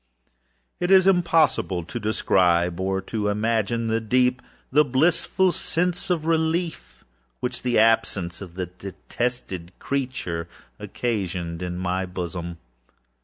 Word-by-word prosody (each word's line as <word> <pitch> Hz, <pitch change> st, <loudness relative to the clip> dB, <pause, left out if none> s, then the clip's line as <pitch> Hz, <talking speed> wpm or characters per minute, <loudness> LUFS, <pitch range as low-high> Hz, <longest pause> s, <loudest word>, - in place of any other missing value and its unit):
It 175 Hz, -, -1 dB
is 190 Hz, -1 st, +7 dB
impossible 165 Hz, -, +3 dB
to 80 Hz, -, -6 dB
describe, 90 Hz, -4 st, +2 dB
or 95 Hz, 0 st, 0 dB
to 105 Hz, +1 st, -3 dB
imagine, 110 Hz, +2 st, 0 dB
the 115 Hz, 0 st, 0 dB
deep, 125 Hz, +2 st, +2 dB, 0.3 s
the 150 Hz, +3 st, +6 dB
blissful 165 Hz, +7 st, +2 dB
sense 175 Hz, +1 st, -1 dB
of 165 Hz, -4 st, 0 dB
relief 165 Hz, +1 st, -1 dB, 0.3 s
which 125 Hz, -, -3 dB
the 125 Hz, -1 st, +1 dB
absence 105 Hz, -5 st, +2 dB
of 90 Hz, -3 st, -9 dB
the 90 Hz, -1 st, -2 dB
detested 95 Hz, 0 st, -5 dB
creature 125 Hz, -12 st, -3 dB, 0.3 s
occasioned 90 Hz, -7 st, -3 dB
in 90 Hz, -1 st, -3 dB
my 95 Hz, +1 st, -1 dB
bosom. 85 Hz, -1 st, -5 dB
110 Hz, 120 wpm, -24 LUFS, 90-140 Hz, 0.3 s, is